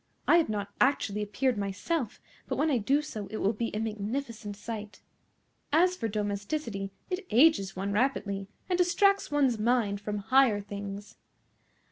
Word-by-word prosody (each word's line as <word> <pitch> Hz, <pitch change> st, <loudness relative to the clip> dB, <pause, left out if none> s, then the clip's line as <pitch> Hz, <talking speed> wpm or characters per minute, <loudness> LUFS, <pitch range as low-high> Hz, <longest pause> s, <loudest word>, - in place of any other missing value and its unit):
I 335 Hz, -, +7 dB
have 330 Hz, -, +2 dB
not 205 Hz, -1 st, -2 dB
actually 210 Hz, -6 st, +2 dB
appeared 215 Hz, +3 st, 0 dB
myself, 205 Hz, -, -2 dB, 0.3 s
but -, -, -1 dB
when 310 Hz, 0 st, +1 dB
I 255 Hz, -, +2 dB
do 275 Hz, +8 st, +2 dB
so 215 Hz, -9 st, -6 dB
it 215 Hz, -, -5 dB
will 205 Hz, +2 st, +1 dB
be 230 Hz, +1 st, -2 dB
a 210 Hz, -, -3 dB
magnificent 220 Hz, 0 st, -4 dB
sight. 210 Hz, -1 st, -7 dB, 0.7 s
As 355 Hz, +4 st, +4 dB
for 230 Hz, -, -2 dB
domesticity, 205 Hz, +1 st, -3 dB, 0.2 s
it 365 Hz, 0 st, -3 dB
ages 230 Hz, -7 st, +4 dB
one 195 Hz, +2 st, -2 dB
rapidly, 200 Hz, -4 st, 0 dB, 0.2 s
and 360 Hz, -1 st, 0 dB
distracts 395 Hz, +3 st, +3 dB
one's 270 Hz, -6 st, +2 dB
mind 215 Hz, -3 st, +1 dB
from 210 Hz, 0 st, -3 dB
higher 235 Hz, +1 st, +4 dB
things." 200 Hz, 0 st, -7 dB
215 Hz, 155 wpm, -29 LUFS, 205-275 Hz, 0.7 s, I